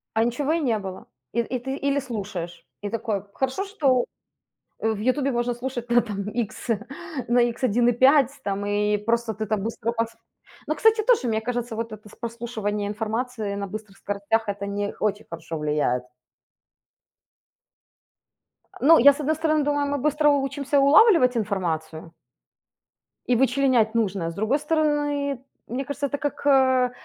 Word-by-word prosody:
А 225 - +3
ничего 275 +6 0
и 335 - +1
не 235 -7 +1
было. 190 -2 -8 0.3
И 235 - +1
и 250 +2 -2
ты 265 +3 -4
или 280 0 0
слушаешь 195 -9 -6 0.2
и 205 - -3
такой: 215 -4 -2
хорошо, 265 +9 -1
что, 280 -11 +1 0.8
э, 220 - 0
в 210 - -5
"Ютубе" 260 +5 +1
можно 240 -1 0
слушать 240 -1 -5
на, 240 0 +6
там, 205 -3 -5
икс 225 +1 -4 0.6
на 240 0 +4
икс 240 +1 -1
1,5, 245 +4 +4
там, 200 0 -2
и 210 +1 +1
просто 230 +2 -1
ты 215 +2 -3
там 210 -2 -1
быстро 230 +1 -2
подс 230 -1 -2 0.5
Но, 310 - 0
кстати, 440 +7 +3
тоже, 440 - +3
мне 220 -1 0
кажется, 240 -1 -3
вот 230 0 -4
это 215 0 -10
прослушивание 220 -3 -3
информации, 220 +1 -3
э, - - -4
на 200 0 -3
быстрых 210 0 -9
скоростях- 205 +2 -1
это 200 0 -3
не 205 0 -3
очень 210 -1 -1
хорошо 165 -1 -6
влияет. 150 -5 0 2.8
Но 320 +4 +7
я, 280 +4 +8
с 285 - -8
одной 305 +2 +1
стороны, 310 -1 +1
думаю, 290 0 +1
мы 285 0 -1
быстро 300 +2 +2
учимся 280 0 0
улавливать 280 - +6
информацию 165 -6 -3 1.1
и 250 - +3
вычленять 255 -3 +2
нужное. 195 -7 0
С - - -9
другой 220 - +1
стороны, 290 -3 0 0.3
мне 255 +4 -3
кажется, 285 +1 -3
это 285 - -3
как, 290 0 -4
э, 260 -2 +4
235 Hz, 160 wpm, -24 LUFS, 210-275 Hz, 2.8 s, я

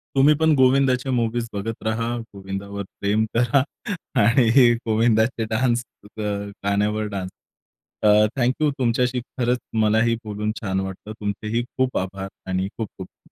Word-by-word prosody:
तुम्हीपण 150 +3 +5
गोविंदाच्या 130 0 +3
मुव्हीज 120 -1 0
बघत 110 +2 -4
राहा, 115 +2 -1 0.2
गोविंदावर 100 +1 -6 0.2
प्रेम 105 +2 +2
करा 120 +4 +3 0.6
आणि 120 +2 +5 0.2
गोविंदाचे 115 +1 +2
डान्स, 120 +1 +1 0.3
अ, - - -4 0.4
गाण्यावर 105 +2 +1
डान्स 95 -1 -4 0.7
अ, - - +5 0.3
थँक 125 0 +2
यू. 155 - +4
तुमच्याशी 125 +1 +1
खरंच 125 0 -1 0.2
मलाही 110 +2 +3
बोलून 105 0 -2
छान 95 -3 -1
वाटतं. 95 +2 -6
तुमचेही 105 +3 -2 0.2
खूप 130 -1 +1
आभार 95 +1 -3 0.2
आणि 95 +1 0
खूप-खूप 100 -4 -8
115 Hz, 125 wpm, -23 LUFS, 100-125 Hz, 0.7 s, तुम्हीपण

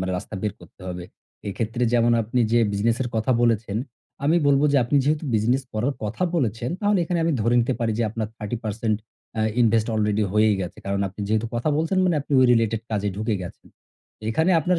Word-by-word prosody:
মানে 95 0 -2
রাস্তা 105 - -9
বের 105 -2 -1
করতে - - -18
হবে। 90 -1 -5 0.4
এক্ষেত্রে 115 +4 -3
যেমন 120 0 +4
আপনি 115 +3 -1
যে 120 - +5
business 115 +3 +1
এর 120 - -3
কথা 110 +4 0
বলেছেন, 115 -3 +1 0.5
আমি 160 +4 +4
বলব 140 0 +4
যে - - +4
আপনি 145 +4 +1
যেহেতু 150 +2 +1
business 120 +5 +2
করার 120 +6 0
কথা 115 - -3
বলেছেন, 120 - -1
তাহলে 205 -2 +2
এখানে 175 0 -1
আমি 165 - +2
ধরে 115 +3 +2
নিতে 125 +2 0
পারি 115 -1 +1
যে - - +2
আপনার 110 -1 -3
৩০% 110 -1 -2 0.4
এ্যা 110 - 0 0.2
invest 115 -1 +3
already 105 0 +1
হয়েই 105 0 +4
গেছে। 90 - -5
কারণ 100 0 -1
আপনি 100 +3 -11
যেহেতু 110 +1 +1
কথা 120 +6 -1
বলছেন 165 +4 0
মানে 180 -2 +2
আপনি 145 - -8
ওই 130 - +6
related 115 -2 +2
কাজে 105 -1 0
ঢুকে 110 +1 -1
গেছেন। 85 - -10 0.6
এখানে 160 +10 +2
আপনার 180 +3 +1
115 Hz, 205 wpm, -23 LUFS, 105-130 Hz, 0.6 s, ওই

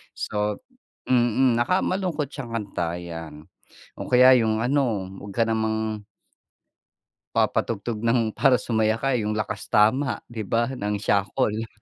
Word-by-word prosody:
So, 105 0 -2 0.5
mm 120 0 +3
naka 180 +10 +2
malungkot 170 -7 -2
siyang 120 -5 -6
kanta 90 -6 -3
'yan. 80 -3 -8 0.5
O - - -8
kaya 130 +1 +7
yung 110 -1 +1
ano 120 -5 0 0.2
wag 100 -1 -9
ka - - +5
namang 110 -1 -2 1.3
papatugtog 110 0 0
ng 115 -2 +2
para 130 +3 +3
sumaya 110 -2 +1
ka 135 - 0
yung 105 0 -2
Lakas 105 -1 -4
Tama 120 +6 +2
'di 110 -2 -4
ba? 115 +4 0
Ng 105 -4 -2
Siakol. 110 +2 0
110 Hz, 130 wpm, -24 LUFS, 105-125 Hz, 1.3 s, kaya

